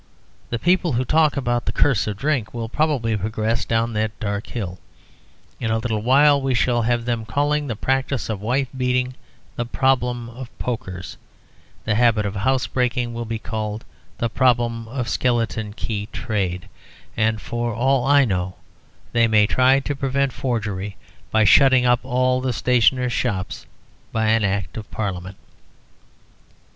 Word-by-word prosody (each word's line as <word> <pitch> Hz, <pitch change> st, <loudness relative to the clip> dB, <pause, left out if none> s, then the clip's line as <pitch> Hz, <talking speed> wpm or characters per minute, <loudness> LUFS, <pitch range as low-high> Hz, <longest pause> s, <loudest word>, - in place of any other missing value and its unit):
The 120 Hz, -, -1 dB
people 175 Hz, +2 st, +2 dB
who 125 Hz, +2 st, 0 dB
talk 155 Hz, +1 st, +3 dB
about 120 Hz, -3 st, 0 dB
the -, -, 0 dB
curse 125 Hz, -7 st, +2 dB
of 105 Hz, -2 st, -3 dB
drink 135 Hz, -4 st, -1 dB
will 115 Hz, -1 st, -3 dB
probably 130 Hz, -4 st, 0 dB
progress 110 Hz, +2 st, -1 dB
down 115 Hz, 0 st, 0 dB
that 110 Hz, 0 st, -2 dB
dark 100 Hz, 0 st, -3 dB
hill. 95 Hz, -6 st, -5 dB, 0.8 s
In 110 Hz, -, -2 dB
a 110 Hz, -, +2 dB
little 110 Hz, -2 st, -2 dB
while 140 Hz, +4 st, +5 dB
we 135 Hz, -1 st, 0 dB
shall 120 Hz, 0 st, +2 dB
have 120 Hz, 0 st, 0 dB
them 120 Hz, -2 st, -1 dB
calling 145 Hz, +6 st, 0 dB
the 115 Hz, -, -3 dB
practice 135 Hz, +1 st, -1 dB
of 105 Hz, -3 st, -4 dB
wife 130 Hz, +5 st, 0 dB
beating 125 Hz, 0 st, 0 dB, 0.4 s
the 120 Hz, -, -1 dB
Problem 125 Hz, -2 st, +1 dB
of 125 Hz, +1 st, -9 dB
Pokers; 95 Hz, -7 st, -5 dB, 0.7 s
the 110 Hz, -, +1 dB
habit 110 Hz, -1 st, +3 dB
of 100 Hz, 0 st, -3 dB
housebreaking 125 Hz, +1 st, 0 dB
will 115 Hz, 0 st, -4 dB
be 115 Hz, 0 st, -3 dB
called 110 Hz, -1 st, -4 dB, 0.3 s
the 115 Hz, -, 0 dB
Problem 120 Hz, -2 st, +1 dB
of 125 Hz, +1 st, -3 dB
the -, -, -4 dB
Skeleton 115 Hz, -3 st, 0 dB
Key 105 Hz, -1 st, -4 dB
Trade; 95 Hz, -5 st, -2 dB, 0.5 s
and 110 Hz, -1 st, +1 dB
for 120 Hz, +2 st, -3 dB
all 130 Hz, +3 st, +2 dB
I 140 Hz, +1 st, +5 dB
know 90 Hz, -4 st, -2 dB, 0.6 s
they 115 Hz, -1 st, +3 dB
may 105 Hz, -2 st, +4 dB
try 130 Hz, +5 st, +4 dB
to 145 Hz, +1 st, -3 dB
prevent 135 Hz, 0 st, 0 dB
forgery 105 Hz, -6 st, -3 dB, 0.3 s
by 110 Hz, 0 st, +3 dB
shutting 130 Hz, +3 st, +6 dB
up 120 Hz, -1 st, +4 dB
all 130 Hz, 0 st, +1 dB
the 130 Hz, -1 st, -1 dB
stationers' 125 Hz, +1 st, +2 dB
shops 100 Hz, -7 st, -2 dB, 0.4 s
by 110 Hz, -1 st, +1 dB
Act 100 Hz, -4 st, 0 dB
of 110 Hz, -1 st, -7 dB
Parliament. 95 Hz, -2 st, -4 dB
120 Hz, 155 wpm, -22 LUFS, 110-130 Hz, 0.8 s, shutting